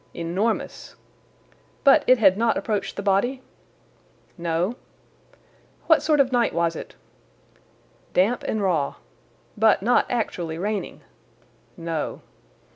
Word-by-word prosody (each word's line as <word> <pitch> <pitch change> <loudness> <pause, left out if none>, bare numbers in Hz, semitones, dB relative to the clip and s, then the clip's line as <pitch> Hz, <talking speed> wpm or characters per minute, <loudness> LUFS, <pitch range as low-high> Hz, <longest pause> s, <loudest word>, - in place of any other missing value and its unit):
"Enormous." 185 +7 -3 0.9
"But 275 -1 +6
it 255 - +6
had 195 -5 +5
not 230 +2 +1
approached 210 -3 -2
the 200 - -5
body?" 245 +7 +1 0.9
"No." 170 +5 -1 1.1
"What 320 -2 +4
sort 305 -2 +2
of 265 -2 +3
night 240 -6 +1
was 170 -1 +1
it?' - - -9 1.2
"Damp 210 +7 +2
and 215 -2 -1
raw." 165 -7 0 0.6
"But 220 -2 +3
not 245 +3 +3
actually 175 -9 -3
raining?" 205 +3 -4 0.8
"No." 165 -3 -4
205 Hz, 110 wpm, -23 LUFS, 170-240 Hz, 1.2 s, But